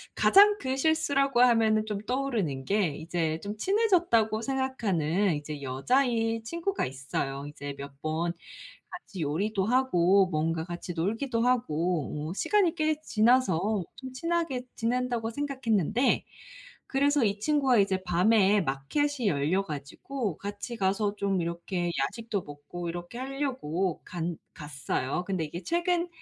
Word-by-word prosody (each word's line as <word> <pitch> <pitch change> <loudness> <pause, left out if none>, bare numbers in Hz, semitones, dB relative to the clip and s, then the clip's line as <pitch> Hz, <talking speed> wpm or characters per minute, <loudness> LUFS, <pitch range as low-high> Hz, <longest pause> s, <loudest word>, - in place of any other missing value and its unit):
가장 410 +1 +6
큰 260 0 -2
실수라고 275 -4 +2
하면은 225 -3 +4
좀 210 -2 -3
떠오르는 225 - -1
게 200 -2 +2
이제 160 -1 -2
좀 205 +1 -5
친해졌다고 345 - +2
생각하는 205 - 0
이제 145 0 -6
여자인 225 - +1
친구가 340 - -2
있어요. 135 +1 -4
이제 145 -1 -7
몇 140 0 -10
번 165 +2 -1 0.6
같이 200 - -8
요리도 190 +7 0
하고 200 -6 +4
뭔가 160 0 -1
같이 175 0 -6
놀기도 225 +8 -1
하고 170 - 0
어 - - -3
시간이 380 - +2
꽤 310 -1 0
지나서 215 - +2
좀 260 -1 -8
친하게 330 -3 -1
지낸다고 235 -1 -1
생각했는데. 255 - +1 0.7
그래서 285 +1 +3
이 200 0 0
친구가 270 -2 +3
이제 195 -2 +2
밤에 195 +3 +4
마켓이 230 - -1
열려 160 +4 +1
가지고 165 - -5
같이 205 +4 -6
가서 200 +1 0
좀 195 -2 0
이렇게 175 +1 -2
야식도 205 +7 -2
먹고 145 +4 -7
이렇게 175 +5 -6
하려고 255 - -2
간 170 -1 -4 0.2
갔어요. 140 0 -3
근데 185 -4 -1
이게 170 +4 -6
최근 345 +1 0
205 Hz, 295 characters per minute, -28 LUFS, 170-260 Hz, 0.7 s, 가장